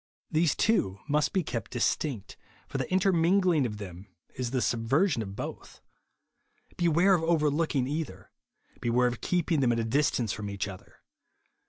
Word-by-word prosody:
These 160 -2 +2
two 100 - +1
must 150 0 +1
be 190 - +1
kept 120 -5 -4
distinct; 120 -3 -1 0.3
for - - -4
the - - -3
intermingling 180 -4 +3
of 105 -2 -7
them 95 -1 -9 0.3
is 125 -1 -3
the 130 +1 0
subversion 120 - +1
of 100 -2 -6
both. - - -7 1.0
Beware 175 +3 +3
of 175 - +3
over 160 -3 +2
looking 145 -4 0
either; 135 - -5 0.5
beware 120 +1 +2
of 120 -1 -4
keeping 175 -3 +1
them 125 -3 +3
at 115 - +1
a - - 0
distance 120 -2 +1
from 105 -1 -5
each 100 0 -3
other. 95 -2 -12
135 Hz, 160 wpm, -28 LUFS, 115-165 Hz, 1.0 s, intermingling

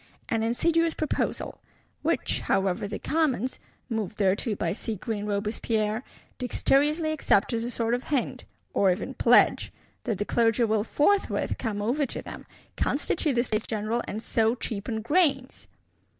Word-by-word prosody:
An 225 -2 +1
insidious 330 +9 +2
proposal; 310 - -2 0.4
which, - - 0
however, 195 0 0
the - - -4
Commons 270 -6 0 0.3
(moved 220 -4 -3
thereto 205 +3 +1
by 170 -3 -1
seagreen 215 0 -4
Robespierre) 215 +2 -1 0.4
dexterously 295 +5 +2
accept 260 -8 +2
as 230 0 0
a 240 - -3
sort 230 -1 0
of 245 +1 -1
hint, 280 -5 -1 0.3
or 195 -2 +4
even 180 - -3
pledge, - - +4 0.3
that 220 - -1
the 205 - -2
Clergy 230 +1 +2
will 220 -2 +2
forthwith 390 - +1
come 205 -4 -2
over 270 +6 +1
to - - -6
them, - - -9 0.3
constitute 295 -5 0
the 240 - +3
States 215 -3 -2
General, 220 +2 -1
and 215 +2 -4
so 225 +1 +2
cheapen 220 -1 -4
grains! 275 -2 +1
230 Hz, 145 wpm, -27 LUFS, 210-265 Hz, 0.4 s, or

